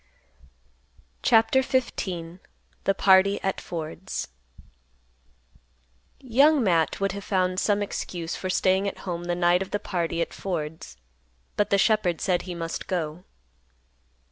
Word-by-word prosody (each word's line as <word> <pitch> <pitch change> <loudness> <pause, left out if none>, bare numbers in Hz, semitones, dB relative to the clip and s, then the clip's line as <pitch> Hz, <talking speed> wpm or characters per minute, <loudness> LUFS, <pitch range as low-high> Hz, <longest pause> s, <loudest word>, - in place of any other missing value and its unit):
CHAPTER 225 +3 +4
XV. 260 -1 0 0.9
THE 195 - +2
PARTY 195 +1 +5
AT 195 - -1
FORD'S. 170 +2 -5 1.9
Young 275 +3 +4
Matt 170 -5 +2
would 195 -1 0
have 200 +1 -6
found 185 -2 0
some 205 0 +1
excuse 175 -4 -4
for 185 - -4
staying 190 +2 +2
at - - -4
home 175 -2 -4
the 175 0 -1
night 175 +1 +3
of 195 - -4
the - - -1
party 170 -5 -2
at 170 - -2
Ford's, 160 - -5 0.6
but 205 - +1
the 200 - +3
shepherd 195 -5 +2
said 180 -2 +1
he 180 -2 -7
must 165 -1 -5
go. 175 -2 -3
185 Hz, 130 wpm, -25 LUFS, 175-200 Hz, 1.9 s, PARTY